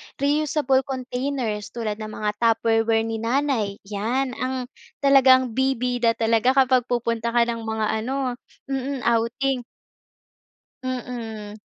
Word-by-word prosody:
Reusable 285 -1 +2
containers 255 -4 -3
tulad 220 -2 -3
ng 215 - -5
mga 215 0 -3
tupperware 225 -1 +2
ni 225 0 -3
nanay, 235 -4 0
yan 230 +6 -1
ang 255 0 -2 0.4
talagang 260 -3 +6
bibida 250 -2 +1
talaga 230 +3 +2
kapag 255 -2 +4
pupunta 235 -1 -1
ka 235 - +6
ng 235 -1 -2
mga 220 -1 -1
ano, 255 +1 -2 0.3
mm, 270 -1 -2
outing. 235 +3 +1 1.2
Mm. 230 -5 -5
245 Hz, 115 wpm, -23 LUFS, 225-265 Hz, 1.2 s, talagang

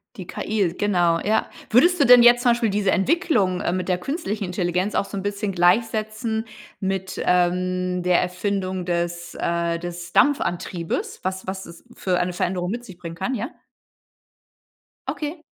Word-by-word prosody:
Die 185 - -7
KI, 195 -1 -1
genau, 175 -5 +2
ja. 220 +4 +1 0.2
Würdest 345 +10 +4
du 280 - +5
denn 245 0 +8
jetzt 240 0 +7
zum 245 - +4
Beispiel 235 -1 +1
diese 200 -1 +1
Entwicklung, 210 - +1
ähm, 175 - 0
mit 185 - -4
der 180 -1 +1
Künstlichen 225 - -3
Intelligenz 180 +2 -1
auch - - +1
so - - -8
'n - - -2
bisschen 205 +1 -2
gleichsetzen 220 +4 +1 0.3
mit, 190 -1 -3
ähm, 180 0 +1
der 180 -1 +4
Erfindung 185 0 -2
des, 170 0 -2
äh 170 0 0
des 175 0 -7
Dampfantriebes, 175 - 0
was 190 0 -3
was 190 0 -5
es 170 0 -13
für 180 -2 0
eine 180 0 -1
Veränderung 180 +1 -1
mit 240 +2 -4
sich 190 -5 -12
bringen 170 -2 -8
kann, 220 +10 -2
ja? 235 +3 -3 1.6
Okay. 305 +2 -4
190 Hz, 160 wpm, -23 LUFS, 175-220 Hz, 1.6 s, denn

